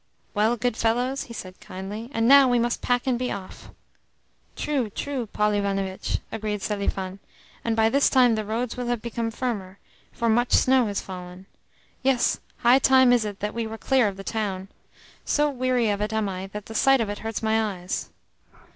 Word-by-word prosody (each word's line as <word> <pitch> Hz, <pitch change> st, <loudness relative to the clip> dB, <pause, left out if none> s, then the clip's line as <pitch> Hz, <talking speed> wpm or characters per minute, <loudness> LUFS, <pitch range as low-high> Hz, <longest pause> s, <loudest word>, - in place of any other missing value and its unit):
"Well, 220 Hz, +3 st, +2 dB
good 245 Hz, +1 st, 0 dB
fellows?" 245 Hz, +4 st, 0 dB
he 235 Hz, -, -10 dB
said 185 Hz, -3 st, -8 dB
kindly. 205 Hz, +5 st, -7 dB
"And 225 Hz, -3 st, +1 dB
now 275 Hz, 0 st, +8 dB
we 245 Hz, -, +3 dB
must 240 Hz, 0 st, 0 dB
pack 245 Hz, 0 st, +1 dB
and 250 Hz, -2 st, +1 dB
be 250 Hz, -, -2 dB
off." 190 Hz, -1 st, -8 dB, 0.9 s
"True, 270 Hz, -7 st, -1 dB
true, 260 Hz, +2 st, -4 dB
Paul 210 Hz, +1 st, +1 dB
Ivanovitch," 195 Hz, -2 st, -1 dB
agreed 210 Hz, -2 st, -3 dB
Selifan. 200 Hz, -2 st, -2 dB, 0.4 s
"And 230 Hz, -1 st, 0 dB
by 220 Hz, 0 st, +4 dB
this 275 Hz, +5 st, +3 dB
time 250 Hz, -3 st, +5 dB
the 215 Hz, -1 st, -1 dB
roads 225 Hz, +3 st, -2 dB
will 245 Hz, -1 st, -4 dB
have 240 Hz, -2 st, -1 dB
become 235 Hz, -1 st, -2 dB
firmer, 215 Hz, -6 st, -4 dB, 0.3 s
for 235 Hz, -, -2 dB
much 240 Hz, +2 st, +2 dB
snow 260 Hz, -2 st, +4 dB
has 200 Hz, -1 st, -2 dB
fallen. 180 Hz, 0 st, -9 dB, 0.6 s
Yes, 260 Hz, -2 st, +2 dB, 0.2 s
high 245 Hz, +3 st, +6 dB
time 260 Hz, -2 st, +5 dB
is 235 Hz, -3 st, +2 dB
it 205 Hz, -2 st, -6 dB
that 210 Hz, +1 st, -2 dB
we 230 Hz, -1 st, -2 dB
were 220 Hz, 0 st, -6 dB
clear 260 Hz, -1 st, +2 dB
of 195 Hz, -1 st, -4 dB
the 195 Hz, -, -7 dB
town. 195 Hz, -3 st, -3 dB, 0.5 s
So 295 Hz, 0 st, +1 dB
weary 250 Hz, -4 st, +1 dB
of 200 Hz, 0 st, -2 dB
it 210 Hz, +1 st, -2 dB
am 220 Hz, -1 st, 0 dB
I 190 Hz, 0 st, -5 dB
that 210 Hz, +1 st, -8 dB
the 225 Hz, -, -9 dB
sight 270 Hz, +4 st, +4 dB
of 225 Hz, -, 0 dB
it 205 Hz, -, -4 dB
hurts 225 Hz, 0 st, -4 dB
my 220 Hz, -3 st, +1 dB
eyes." 180 Hz, +1 st, -4 dB
225 Hz, 195 wpm, -25 LUFS, 205-245 Hz, 0.9 s, now